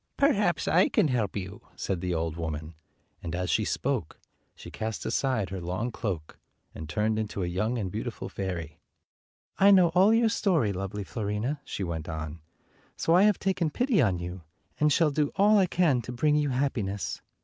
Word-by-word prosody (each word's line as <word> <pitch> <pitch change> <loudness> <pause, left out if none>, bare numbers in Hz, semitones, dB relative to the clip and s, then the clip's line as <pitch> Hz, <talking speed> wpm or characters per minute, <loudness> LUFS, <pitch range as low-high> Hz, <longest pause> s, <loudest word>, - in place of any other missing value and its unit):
"Perhaps 205 - +2
I 180 +5 +4
can 190 -9 +2
help 115 -6 -1
you," 100 0 -6
said 95 -3 -3
the 90 - -2
old 80 -2 -1
woman; 80 -1 -5 0.5
and 85 0 -4
as 90 0 -1
she 110 - +2
spoke 125 - -2 0.4
she - - -11
cast 110 0 -4
aside 130 -8 0
her 95 - -4
221 90 +1 -4
long 115 +4 -2
cloak, 95 -10 -5 0.3
and 80 0 -8
turned 110 +3 0
into 105 -3 -3
a - - 0
young 105 +8 -1
and 95 -5 -3
beau - - -3
tiful - - -5
fairy. 85 -6 -5 0.8
"I 195 - +7
know 185 -4 +6
all 185 +5 +5
your 225 0 +4
story, 170 - +1
lovely 95 +2 -4
Fiorina," 110 +7 -3
she 100 - -5
went 85 -2 -4
on, 80 0 -5 0.6
"so 165 - +2
I 180 - +6
have 210 -3 +4
taken 185 -4 0
pity 245 - +2
on 95 -8 +2
you, 90 +1 -6 0.4
and 150 0 +3
shall 155 +1 +3
do 145 0 0
all 210 +1 +5
I 190 - +3
can 165 -8 +2
to 120 - -7
bring 150 +5 +2
you 150 -1 +1
happiness. 120 -7 -2
110 Hz, 195 wpm, -28 LUFS, -, 0.8 s, I